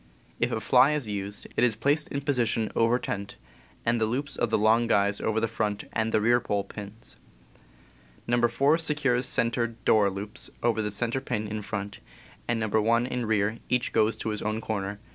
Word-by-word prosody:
If - - +1
a - - -1
fly 145 - +4
is 145 -6 -2
used, 100 0 -5
it - - +2
is 120 -3 +3
placed 145 +7 +1
in 140 - -4
position 120 -6 0
over 115 +2 +3
tent, 100 -5 -5 0.5
and 115 0 +1
the 110 - +2
loops 140 +5 -3
of 120 - 0
the 110 - +2
long 110 +2 +3
guys 100 -2 +2
over 110 0 0
the 115 - 0
front 105 -2 -2
and 110 0 0
rear 115 +3 +3
pole 105 -4 -1
pins. 105 +3 -10 1.1
No. 120 0 +3
4 145 +6 +2
secures 135 -6 +1
center 115 0 +1
(door) 110 -3 +2
loops 100 +3 -4
over 110 -3 +1
center 120 +5 -2
pin 110 -5 -3
in 105 +1 -4
front, 100 -1 -5 0.5
and 120 -1 0
No. 110 - -1
1 115 +3 +2
in 125 -2 -3
rear. 110 +1 +1
Each 125 -1 0
goes 110 0 +2
to - - -3
his 105 -1 -3
corner. 105 -2 -3
115 Hz, 185 wpm, -27 LUFS, 105-120 Hz, 1.1 s, fly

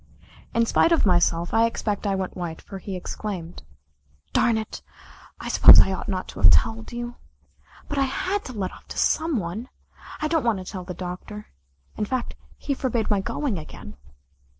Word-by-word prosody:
In 230 0 +4
spite 330 - +3
of 330 - +3
myself, 175 -2 +2
I 225 +1 +5
expect 210 -2 -2
I 195 - +1
went 190 -1 -3
white, 170 -3 -5
for 195 - -9
he 190 +1 -6
exclaimed: 180 -2 -6 0.7
"Darn 230 -2 +3
it, 220 0 -5 0.6
I - - -6
suppose - - +9
I - - +5
ought 190 - -4
not 185 -2 -2
to - - -9
have 95 - +9
told 110 +8 +2
you. 240 0 -5 0.7
But 290 - -2
I 275 - +3
had 370 +9 -2
to 255 - -7
let 195 -4 -3
off - - -15
to - - -8
some 320 -3 +2
one. 205 +6 -4 0.5
I 310 - 0
don't 320 -1 +1
want 230 -4 +2
to 185 - -7
tell 185 0 -6
the 180 -1 -6
Doctor. 185 +4 -7 0.5
In 210 - 0
fact, 255 +2 -3 0.2
he 285 - -2
forbade 240 -5 -1
my 205 - +3
going 230 - -2
again." 70 - -10
210 Hz, 190 wpm, -24 LUFS, 180-240 Hz, 0.7 s, suppose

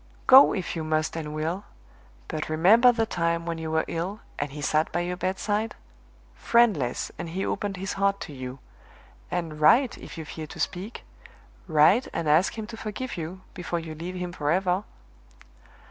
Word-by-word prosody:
"Go, 265 +2 +9
if 185 -3 -3
you 165 - -3
must 155 0 0
and 155 -2 -4
will! 160 +6 -2 0.6
but 155 -2 -4
remember 205 +11 +6
the 230 -2 0
time 170 -4 -1
when 165 -1 -3
you 160 -1 -4
were 160 0 +1
ill, 185 +6 -4 0.2
and 145 -1 -2
he 150 - -8
sat 155 +2 +1
by 175 - 0
your 180 +1 -2
bedside; 205 +4 -1 0.6
friendless, 210 - +2
and 170 - -4
he 185 +4 -2
opened 200 -1 -2
his 195 +2 -3
heart 200 0 +1
to 150 - -7
you 130 -1 -7 0.7
and 160 -4 -3
write, 235 - +5
if - - -10
you 160 - -6
fear 155 +1 -7
to - - -11
speak; 200 +5 -4 0.6
write 165 - +5
and 165 -2 -2
ask 160 +8 +3
him 220 - -4
to 225 +1 -9
forgive 225 +4 -5
you, 175 +3 -6
before 175 -1 -3
you 165 -1 -5
leave 170 +4 -6
him 180 -1 -4
forever!" 180 +5 0
175 Hz, 175 wpm, -26 LUFS, 155-200 Hz, 0.7 s, Go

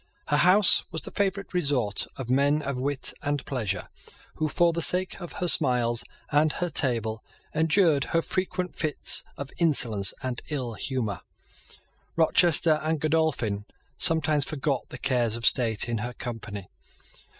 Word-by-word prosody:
Her 145 - +2
house 185 +5 +6
was 160 - -5
the - - -2
favourite 195 0 -2
resort 135 - 0
of 130 - -6
men 140 +4 +1
of 140 -2 -4
wit 140 +1 -1
and 145 -1 -3
pleasure, 120 -8 -3 0.5
who, 155 - 0
for 170 +2 +2
the 170 - -1
sake 185 +3 +2
of 175 - -8
her 180 - -3
smiles 125 -7 +2 0.3
and 150 +1 +2
her 175 -1 -3
table, 115 -6 -1 0.3
endured 160 -2 +2
her 165 0 0
frequent 180 -1 -3
fits 155 -2 +1
of 140 0 -7
insolence 115 - +3
and 130 -2 -4
ill 130 -6 -3
humour. 110 - -4 0.9
Rochester 165 -1 +4
and 160 0 -1
Godolphin 140 -10 -1 0.3
sometimes 155 -2 +2
forgot 140 -1 -3
the - - -8
cares 120 -4 0
of 115 -1 -3
state 115 -3 +2
in 115 -2 -2
her 120 +3 -5
company. 110 -7 -7
145 Hz, 150 wpm, -26 LUFS, 120-160 Hz, 0.9 s, house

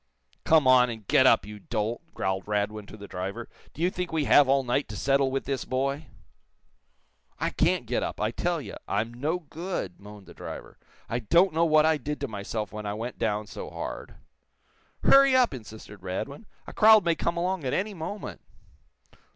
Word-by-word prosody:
"Come 160 -3 +5
on, 125 -1 +6
and 110 -4 -8
get - - +5
up, - - +4
you 105 0 -9
dolt!" 110 +2 -3
growled 95 0 -2
Radwin 105 0 -2
to - - -11
the 100 -1 -10
driver. 95 +6 -5 0.3
"Do 165 - -3
you 180 - +3
think 180 -1 -4
we 160 -2 0
have 140 -1 +6
all 135 0 +3
night 125 +3 0
to 105 - -6
settle 135 +3 +2
with 135 0 -2
this 135 -3 -2
boy?" 135 +3 -2 1.3
"I - - -1
can't - - +1
get - - -1
up, - - -4
I - - 0
tell - - -1
you. - - -8
I'm 110 +4 -1
no 150 +8 -1
good," 170 - -5
moaned 105 0 -12
the - - -13
driver. - - -9 0.3
"I 115 - -2
don't 170 - +3
know 165 +1 +3
what 155 -1 +5
I 160 -1 +3
did 150 +2 -4
to 140 - -1
myself 105 0 -5
when 105 -1 -5
I 100 - -3
went 115 +3 -6
down 105 -1 0
so - - -8
hard." - - -7 0.9
"Hurry 275 -1 +6
up!" 250 - +4
insisted 110 -4 -10
Radwin. 110 - -5 0.2
"A - - -9
crowd 215 -2 +6
may 170 - +3
come 170 +1 -2
along 180 -1 -1
at 130 - -2
any 205 +2 -1
moment." 195 +4 -6
130 Hz, 195 wpm, -27 LUFS, 105-160 Hz, 1.3 s, on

